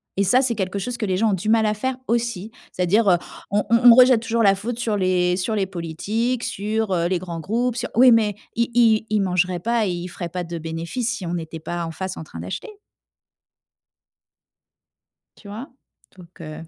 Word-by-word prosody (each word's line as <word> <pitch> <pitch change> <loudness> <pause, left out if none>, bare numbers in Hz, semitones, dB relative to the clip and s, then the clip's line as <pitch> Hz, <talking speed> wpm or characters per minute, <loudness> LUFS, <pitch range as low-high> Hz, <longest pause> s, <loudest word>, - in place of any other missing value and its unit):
et 200 - +1
ça, 250 +8 +3
c'est 250 -3 +1
quelque 195 -2 -3
chose 240 +5 -4
que 215 - -2
les 185 -1 0
gens 220 +2 +2
ont - - +1
du 195 +3 -2
mal 225 -1 +4
à 210 - +2
faire, 255 +5 -3
aussi. 230 -3 -2 0.2
C'est-à-dire, 195 +4 +2
heu, 175 - +5 0.3
on 205 +1 +1
on 235 - +6
on 230 - +9
rejette 255 -2 +6
toujours 230 0 0
la 195 -2 +6
faute 225 +5 -4
sur 230 -3 -1
les 180 -2 +1
sur 215 +4 -1
les 200 -2 +1
politiques, 200 +8 -3
sur, 215 +1 -2
heu, 170 -1 +1
les 185 +1 0
grands 170 -1 -6
groupes, 230 +8 -1
sur 245 +1 -3
oui, 250 +1 +7
mais 215 -3 +3 0.2
ils 235 0 0
ils 225 -2 +4
ils 215 0 +1
mangeraient 180 -1 0
pas 230 +2 0
et - - -1
ils 175 0 -4
feraient 175 0 -6
pas 180 +1 -4
de 170 0 -6
bénéfices, 165 +9 -3
si 190 - -7
on 170 - -3
n'était 165 -1 -5
pas 170 +2 -4
en - - -5
face, 190 +3 -5
en - - -7
train 85 - -10
d'acheter! 90 +2 -6 2.7
Tu 205 - -15
vois? 220 +7 -7 0.5
Donc, 175 0 -15
heu 155 0 -8
200 Hz, 215 wpm, -22 LUFS, 180-230 Hz, 2.7 s, on